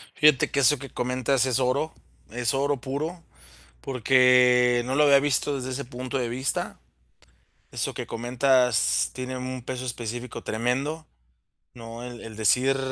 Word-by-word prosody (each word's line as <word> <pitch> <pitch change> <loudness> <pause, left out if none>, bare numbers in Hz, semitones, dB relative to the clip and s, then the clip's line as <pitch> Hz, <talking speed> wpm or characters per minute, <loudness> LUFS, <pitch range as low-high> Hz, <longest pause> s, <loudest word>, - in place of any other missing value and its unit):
Fíjate 150 -3 +4
que 140 - 0
eso 135 +4 +4
que 135 0 -9
comentas 130 +2 0
es 130 0 0
oro, 140 +5 0 0.4
es 120 +1 -1
oro 140 +1 0
puro, 155 +7 -4 0.6
porque 125 -1 +4
no 130 - -2
lo 150 +2 +4
había 140 -1 +6
visto 145 0 0
desde 130 -1 -5
ese 140 +2 -4
punto 125 +1 -6
de 125 -2 -2
vista, 130 +3 -3 0.9
eso - - -3
que - - -5
comentas 120 - +2
tiene 130 0 -5
un 130 0 -5
peso 130 +1 -5
específico 120 0 -6
tremendo, 135 +8 -2 0.7
¿no? 115 0 -9
El 120 -1 -8
el 110 -1 -9
decir 125 +5 +2
125 Hz, 150 wpm, -25 LUFS, 120-135 Hz, 0.9 s, había